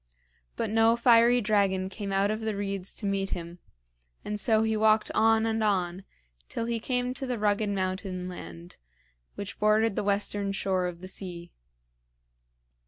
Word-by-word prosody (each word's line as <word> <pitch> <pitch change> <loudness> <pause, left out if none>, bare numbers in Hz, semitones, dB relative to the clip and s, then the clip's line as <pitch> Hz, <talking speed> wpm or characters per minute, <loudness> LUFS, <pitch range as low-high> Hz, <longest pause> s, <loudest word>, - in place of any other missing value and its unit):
But - - -2
no 225 +1 +4
fiery 235 0 +5
dragon 200 -3 +1
came 200 +1 -6
out 195 +1 +2
of 215 - -2
the 220 -2 -3
reeds 195 -2 -3
to 210 - -4
meet 195 -1 -1
him; 170 +1 -9 0.7
and 210 0 -2
so 220 +1 +3
he 220 0 0
walked 215 0 +3
on 225 0 +3
and 225 0 0
on 185 -3 0 0.4
till 230 - -3
he 230 0 -1
came 250 +1 -1
to 265 0 -4
the 250 -1 -2
rugged 210 0 +1
mountain 185 -1 -3
land 85 - -10 0.6
which 200 -1 -6
bordered 215 0 +3
the - - -1
western 200 0 0
shore 190 -2 0
of 175 -1 -7
the 185 - -8
sea. 175 -2 -7
205 Hz, 165 wpm, -28 LUFS, 190-220 Hz, 0.7 s, fiery